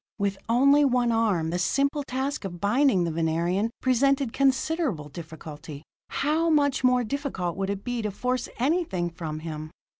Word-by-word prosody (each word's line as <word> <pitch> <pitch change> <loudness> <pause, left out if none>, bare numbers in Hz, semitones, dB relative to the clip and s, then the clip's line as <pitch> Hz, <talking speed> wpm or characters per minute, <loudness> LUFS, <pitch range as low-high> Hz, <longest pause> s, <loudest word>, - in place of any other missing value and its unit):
With 200 -2 -1
only 280 +5 +5
one 250 -3 +2
arm, 205 -8 +1
the 175 - -1
simple 280 - +1
task 270 0 -3
of 175 -3 -6
binding 210 -1 +3
the 170 - -1
Venerian 170 +6 0
presented 270 0 +2
considerable 275 - 0
difficulty. 155 -1 -9 0.3
How 320 +3 +1
much 285 -4 +2
more 250 -1 +4
difficult 225 - -3
would 195 0 -2
it 200 0 -3
be 245 -1 -2
to 210 - -2
force 250 +5 -2
anything 250 - 0
from 155 -2 -6
him? 155 -1 -6
225 Hz, 155 wpm, -26 LUFS, 175-275 Hz, 0.3 s, only